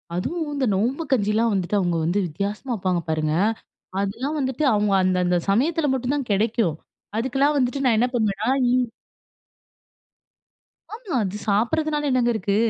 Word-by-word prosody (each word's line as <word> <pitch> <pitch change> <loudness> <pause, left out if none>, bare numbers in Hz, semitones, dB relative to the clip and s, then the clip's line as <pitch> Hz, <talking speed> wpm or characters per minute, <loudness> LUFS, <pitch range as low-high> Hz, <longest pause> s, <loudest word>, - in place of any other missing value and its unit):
அதுவும் 320 - -2
இந்த 275 -2 0
நோம்பு 245 - 0
கஞ்சில்லாம் 220 -1 +2
வந்துட்டு 195 +2 0
அவுங்க 175 -2 0
வந்து 185 +5 +1
வித்தியாசமா 205 - -4
வப்பாங்க 180 -4 -1
பாருங்க. 155 -1 0 0.7
அதெல்லாம் 255 +10 -2
வந்துட்டு 265 +2 -1
அவுங்க 205 -1 +2
அந்த, 185 0 +2
அந்த 180 0 +2
சமயத்தில 295 - +2
மட்டுந்தான் 260 0 -2
கிடைக்கும். 210 -4 +1 0.4
அதுக்கெல்லாம் 270 +5 +1
வந்துட்டு 270 +2 0
நான் 230 -3 +4
என்ன 245 - +3
பண்ணுவேன்னா, 215 0 0 2.4
ஆமா. 435 - -5
அது 195 +2 -3
சாப்பிடுறதுனால 295 +8 +1
என்னங்க 245 -2 +2
இருக்கு? 200 -1 -1
230 Hz, 130 wpm, -23 LUFS, 195-275 Hz, 2.4 s, நான்